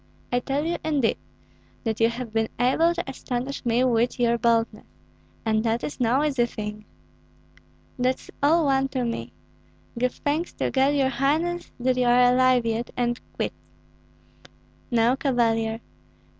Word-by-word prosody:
I 245 Hz, -, +2 dB
tell 275 Hz, +4 st, -2 dB
you, 340 Hz, +1 st, -1 dB
indeed, 290 Hz, -7 st, +1 dB, 0.7 s
that 220 Hz, -2 st, -2 dB
you 230 Hz, 0 st, +4 dB
have 235 Hz, -1 st, -6 dB
been 225 Hz, 0 st, +1 dB
able 320 Hz, +8 st, +3 dB
to 345 Hz, -, -4 dB
astonish 265 Hz, 0 st, -4 dB
me 240 Hz, +1 st, +2 dB
with 240 Hz, 0 st, +1 dB
your 235 Hz, -1 st, +3 dB
boldness, 230 Hz, -2 st, 0 dB, 0.6 s
and 220 Hz, -1 st, +1 dB
that 230 Hz, 0 st, 0 dB
is 290 Hz, -, -5 dB
no 250 Hz, +4 st, +2 dB
easy 270 Hz, -5 st, +1 dB
thing." 210 Hz, -2 st, -6 dB, 1.1 s
"That's 255 Hz, +1 st, -1 dB
all 315 Hz, +3 st, +4 dB
one 270 Hz, -1 st, +2 dB
to 260 Hz, -2 st, -2 dB
me. 120 Hz, -, -4 dB, 0.7 s
Give 250 Hz, 0 st, 0 dB
thanks 305 Hz, +4 st, -2 dB
to -, -, -2 dB
God, 270 Hz, +2 st, +2 dB
your 270 Hz, -2 st, +2 dB
highness, 310 Hz, +7 st, 0 dB
that 255 Hz, +1 st, +1 dB
you 250 Hz, -, +2 dB
are 245 Hz, 0 st, +5 dB
alive 255 Hz, -1 st, +4 dB
yet, 230 Hz, +1 st, -1 dB
and 240 Hz, 0 st, 0 dB, 0.2 s
quits." -, -, -1 dB, 1.4 s
"No, 235 Hz, +1 st, +3 dB
Cavalier. 230 Hz, -4 st, 0 dB
245 Hz, 150 wpm, -25 LUFS, 230-275 Hz, 1.4 s, are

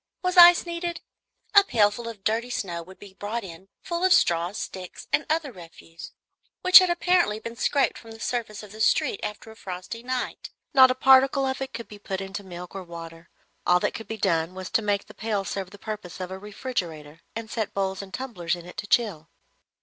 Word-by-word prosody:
Was 365 Hz, 0 st, 0 dB
ice 350 Hz, 0 st, +9 dB
needed? 340 Hz, 0 st, -4 dB, 0.5 s
A 405 Hz, -1 st, +9 dB
pailful 220 Hz, -, +1 dB
of 210 Hz, -4 st, -10 dB
dirty 230 Hz, +3 st, 0 dB
snow 175 Hz, -8 st, -3 dB
would 185 Hz, +3 st, -13 dB
be 200 Hz, -2 st, -13 dB
brought 215 Hz, +4 st, -4 dB
in, 180 Hz, 0 st, -11 dB, 0.2 s
full 345 Hz, -1 st, -3 dB
of 375 Hz, -1 st, +6 dB
straws, 175 Hz, -, +2 dB
sticks, 185 Hz, -2 st, -7 dB
and 300 Hz, -, +2 dB
other 310 Hz, -3 st, 0 dB
refuse, 165 Hz, -3 st, -12 dB, 0.5 s
which 370 Hz, +1 st, +11 dB
had 370 Hz, -1 st, +2 dB
apparently 345 Hz, -10 st, +2 dB
been 230 Hz, +1 st, -7 dB
scraped 275 Hz, +3 st, +1 dB
from 230 Hz, -, -14 dB
the 225 Hz, 0 st, -11 dB
surface 220 Hz, -3 st, -3 dB
of 210 Hz, -, -12 dB
the 215 Hz, +1 st, -8 dB
street 405 Hz, -, +2 dB
after 210 Hz, +1 st, -6 dB
a -, -, -14 dB
frosty 190 Hz, +2 st, -7 dB
night. 255 Hz, +1 st, -4 dB, 0.2 s
Not 260 Hz, -3 st, +8 dB
a 255 Hz, -, +1 dB
particle 265 Hz, +1 st, +5 dB
of 265 Hz, 0 st, -2 dB
it 265 Hz, -, -4 dB
could 235 Hz, -, -7 dB
be 210 Hz, -, -12 dB
put 190 Hz, -2 st, -4 dB
into 195 Hz, +1 st, -6 dB
milk 180 Hz, -1 st, -9 dB
or 195 Hz, -, -5 dB
water; 165 Hz, -1 st, -10 dB, 0.3 s
all 180 Hz, 0 st, +4 dB
that -, -, 0 dB
could 225 Hz, -, -8 dB
be 220 Hz, -, -5 dB
done 170 Hz, -3 st, 0 dB
was 185 Hz, -1 st, -7 dB
to -, -, +2 dB
make 205 Hz, -1 st, 0 dB
the -, -, -14 dB
pail 210 Hz, -2 st, -2 dB
serve 190 Hz, +1 st, -4 dB
the 205 Hz, -, -13 dB
purpose 205 Hz, -5 st, -7 dB
of 185 Hz, 0 st, -5 dB
a 190 Hz, -, -6 dB
refrigerator, 175 Hz, -, -5 dB
and 225 Hz, -1 st, -6 dB
set 220 Hz, -3 st, -3 dB
bowls 190 Hz, -1 st, -1 dB
and 195 Hz, -1 st, -11 dB
tumblers 190 Hz, -9 st, -3 dB
in 175 Hz, -1 st, -11 dB
it 180 Hz, -, -12 dB
to 205 Hz, 0 st, -5 dB
chill. 195 Hz, -9 st, +1 dB
210 Hz, 215 wpm, -25 LUFS, 185-255 Hz, 0.5 s, which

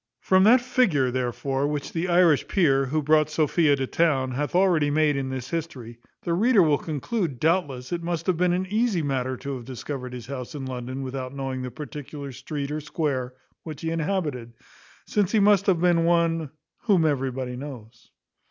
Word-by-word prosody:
From 190 Hz, 0 st, +4 dB
that 240 Hz, +3 st, +6 dB
figure, 195 Hz, -, +2 dB
therefore, 130 Hz, +2 st, -1 dB
which 145 Hz, -1 st, -4 dB
the 170 Hz, +2 st, -1 dB
Irish 175 Hz, -4 st, +4 dB
peer, 135 Hz, -8 st, +2 dB
who 155 Hz, +3 st, -1 dB
brought 155 Hz, +1 st, +3 dB
Sophia 155 Hz, -1 st, +2 dB
to 135 Hz, -1 st, -2 dB
town, 135 Hz, -3 st, +1 dB
hath 145 Hz, +6 st, -3 dB
already 175 Hz, -6 st, +3 dB
made 150 Hz, 0 st, +2 dB
in 135 Hz, -1 st, -2 dB
this 130 Hz, -1 st, -5 dB
history, 130 Hz, -9 st, -5 dB, 0.2 s
the 170 Hz, -, -1 dB
reader 215 Hz, +2 st, +4 dB
will 150 Hz, -3 st, +2 dB
conclude, 155 Hz, -, -3 dB
doubtless, 145 Hz, -6 st, 0 dB
it 175 Hz, -1 st, -2 dB
must 170 Hz, -1 st, -3 dB
have 185 Hz, -, +2 dB
been 180 Hz, +2 st, +2 dB
an 180 Hz, +1 st, 0 dB
easy 210 Hz, -3 st, 0 dB
matter 130 Hz, -2 st, -1 dB
to 140 Hz, +2 st, -5 dB
have 120 Hz, -, -10 dB
discovered 130 Hz, 0 st, -6 dB
his 125 Hz, -2 st, -7 dB
house 130 Hz, +1 st, -7 dB
in 135 Hz, -2 st, -5 dB
London 130 Hz, +1 st, -5 dB
without 130 Hz, 0 st, -5 dB
knowing 135 Hz, -1 st, -4 dB
the 125 Hz, -, -4 dB
particular 145 Hz, 0 st, -8 dB
street 140 Hz, +2 st, -5 dB
or 155 Hz, +1 st, -3 dB
square 140 Hz, -5 st, -2 dB, 0.3 s
which 155 Hz, -3 st, -8 dB
he 165 Hz, -, -2 dB
inhabited, 150 Hz, -8 st, -2 dB, 0.5 s
since 205 Hz, -2 st, 0 dB
he 220 Hz, -, +4 dB
must 200 Hz, -1 st, +4 dB
have 185 Hz, -4 st, +3 dB
been 175 Hz, -1 st, +3 dB
one 165 Hz, -2 st, +1 dB, 0.4 s
whom 190 Hz, -8 st, +4 dB
everybody 130 Hz, -3 st, -1 dB
knows. 125 Hz, -4 st, -10 dB
150 Hz, 185 wpm, -25 LUFS, 130-170 Hz, 0.5 s, that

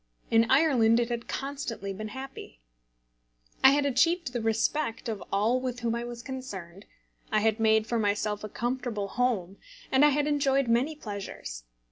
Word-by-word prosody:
In 225 Hz, 0 st, +4 dB
Ireland 255 Hz, -6 st, +4 dB
it 240 Hz, 0 st, 0 dB
had 235 Hz, -1 st, -4 dB
constantly 270 Hz, -8 st, -4 dB
been 215 Hz, +3 st, -6 dB
happy. 265 Hz, -, -9 dB, 1.0 s
I 265 Hz, -, +10 dB
had 285 Hz, +1 st, +2 dB
achieved 285 Hz, +2 st, +2 dB
the 240 Hz, -, -2 dB
respect 225 Hz, +4 st, 0 dB
of 220 Hz, -3 st, -4 dB
all 220 Hz, +6 st, +2 dB
with 250 Hz, -1 st, -4 dB
whom 230 Hz, -1 st, 0 dB
I 235 Hz, 0 st, -3 dB
was 240 Hz, 0 st, -7 dB
concerned, 205 Hz, -9 st, -7 dB, 0.5 s
I 215 Hz, -, +3 dB
had 220 Hz, +1 st, +2 dB
made 220 Hz, -1 st, +4 dB
for 235 Hz, +1 st, -1 dB
myself 210 Hz, 0 st, 0 dB
a 215 Hz, -, -5 dB
comfortable 240 Hz, -3 st, -3 dB
home, 205 Hz, -6 st, -1 dB, 0.3 s
and 265 Hz, +2 st, +5 dB
I 295 Hz, -, +7 dB
had 290 Hz, 0 st, +1 dB
enjoyed 275 Hz, -3 st, +2 dB
many 250 Hz, +7 st, +2 dB
pleasures. 190 Hz, -, -7 dB
235 Hz, 165 wpm, -28 LUFS, 215-265 Hz, 1.0 s, I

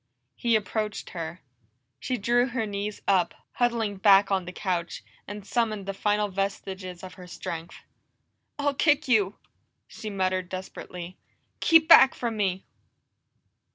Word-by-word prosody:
He 235 Hz, -1 st, +1 dB
approached 215 Hz, 0 st, -2 dB
her. 170 Hz, 0 st, -6 dB, 0.6 s
She 255 Hz, -, -2 dB
drew 240 Hz, +3 st, +2 dB
her 240 Hz, -3 st, -2 dB
knees 205 Hz, 0 st, -4 dB
up, 185 Hz, -3 st, +2 dB, 0.2 s
huddling 230 Hz, -4 st, 0 dB
back 200 Hz, 0 st, +5 dB
on 190 Hz, -2 st, +1 dB
the 180 Hz, -, -6 dB
couch, 180 Hz, -2 st, -3 dB, 0.2 s
and 205 Hz, 0 st, -7 dB
summoned 215 Hz, -3 st, -1 dB
the 195 Hz, -, -3 dB
final 210 Hz, +1 st, +1 dB
vestiges 190 Hz, -2 st, -4 dB
of 185 Hz, -, -8 dB
her 180 Hz, -1 st, -12 dB
strength. 170 Hz, -1 st, -6 dB, 0.8 s
"I'll 285 Hz, -1 st, 0 dB
kick 295 Hz, +1 st, +2 dB
you!" 210 Hz, -5 st, +3 dB, 0.5 s
she 215 Hz, -, -7 dB
muttered 185 Hz, -2 st, -1 dB
desperately. 185 Hz, -1 st, -7 dB, 0.4 s
"Keep 325 Hz, -1 st, +5 dB
back 270 Hz, -5 st, +8 dB
from 235 Hz, -2 st, -3 dB
me!" 190 Hz, -3 st, -1 dB
200 Hz, 135 wpm, -26 LUFS, 185-230 Hz, 0.8 s, back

